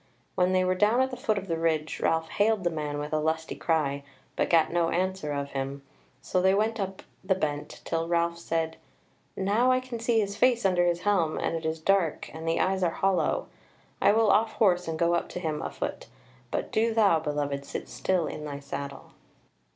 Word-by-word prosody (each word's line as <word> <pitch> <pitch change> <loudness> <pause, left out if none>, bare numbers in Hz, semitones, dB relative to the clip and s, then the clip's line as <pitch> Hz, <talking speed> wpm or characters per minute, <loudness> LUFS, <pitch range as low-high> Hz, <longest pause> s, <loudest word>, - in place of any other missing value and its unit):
When 180 0 +2
they 185 0 +3
were 185 0 +2
down 210 +6 +3
at 260 0 +1
the - - -4
foot 220 -4 0
of 195 0 -4
the 165 -2 -1
ridge 160 -2 0
Ralph 160 0 +1
hailed 210 -1 +1
the 175 - +1
man 150 -2 -3
with 150 +1 -4
a 155 - +2
lusty 160 +1 -1
cry, 145 -4 0 0.3
but - - 0
gat 165 -1 +3
no 170 -1 +2
answer 185 -4 -1
of 140 -1 -3
him; 135 +1 -4 0.4
so 185 - 0
they 190 +1 +4
went 220 +2 0
on 195 - 0
up 190 0 -13 0.2
the 190 0 +2
bent, 150 -5 -3
till 165 0 -1
Ralph 170 0 0
said: 165 -1 -2 0.6
"Now 215 +7 +2
I 255 - +3
can 255 -2 -6
see 230 0 +2
his 200 -1 -1
face 240 -1 +3
under 175 -2 +3
his 175 0 0
helm, 185 -6 +1
and - - -1
it 160 -1 -3
is 160 0 -2
dark 180 -2 +1
and 160 +1 -7
the 165 - +1
eyes 190 0 +1
are 175 - +3
hollow: 190 +2 +1 0.6
I - - +6
will 220 -1 +4
off 220 +2 +3
horse 180 -5 +2
and 160 -1 -2
go 170 +1 +2
up 170 - 0
to - - -5
him 155 -4 -2
afoot, - - -5 0.4
but - - -3
do 225 +1 +1
thou, 200 -7 +5
beloved, 145 -2 -2
sit - - -6
still 165 +8 0
in 150 - -6
thy 145 -2 -5
saddle." 140 0 -7
170 Hz, 215 wpm, -27 LUFS, 155-195 Hz, 0.6 s, I